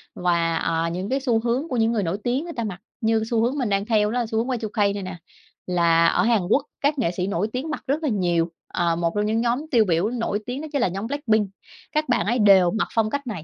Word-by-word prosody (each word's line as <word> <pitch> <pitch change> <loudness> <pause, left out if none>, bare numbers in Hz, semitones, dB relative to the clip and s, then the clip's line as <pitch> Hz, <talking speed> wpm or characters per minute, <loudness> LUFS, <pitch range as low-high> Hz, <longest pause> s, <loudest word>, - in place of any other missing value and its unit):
Và, 170 -2 +1
à, 165 0 0
những 185 +4 -4
cái 270 - +1
xu 245 -4 +1
hướng 245 +6 -1
của 255 - -2
những 225 0 +2
người 220 -3 0
nổi 175 +2 -1
tiếng 250 +4 0
người 340 0 -7
ta 235 - -2
mặc, 195 -4 -5 0.2
như 220 -1 +2
xu 230 -1 +2
hướng 245 +5 0
mình 250 -6 -1
đang 200 0 0
theo 210 -2 +2
đó 245 - 0
là 240 - 0
xu 220 0 -3
hướng 230 +2 0
Y2K 210 -2 0
này 200 -1 -5
nè, 185 0 -6 0.5
là 170 -2 +3
ở - - +2
Hàn 230 -3 +3
Quốc 270 +5 +3 0.2
các 285 0 +1
nghệ 195 -9 +1
sĩ 180 +1 -2
nổi 195 +1 0
tiếng 260 +5 -3
mặc 305 - -4
rất 295 +4 0
là 300 - +1
nhiều, 175 -5 +1 0.2
ờ, 170 -1 0
một 170 0 0
trong 210 0 +1
những 220 +2 +1
nhóm 245 +5 0
tiêu 230 -4 +4
biểu 175 +2 +1
nổi 230 -4 -2
tiếng 250 +3 -4
đó 315 - -6
chính 285 -3 0
là - - +3
nhóm 195 +4 -4
Blackpink. 225 -7 +1 0.4
Các 305 -2 -1
bạn 240 - +2
ấy 240 +4 +1
đều 195 -4 +6
mặc 220 - -1
phong 220 -1 +2
cách 280 +2 -3
này, 195 -9 -5
220 Hz, 275 wpm, -23 LUFS, 185-245 Hz, 0.5 s, đều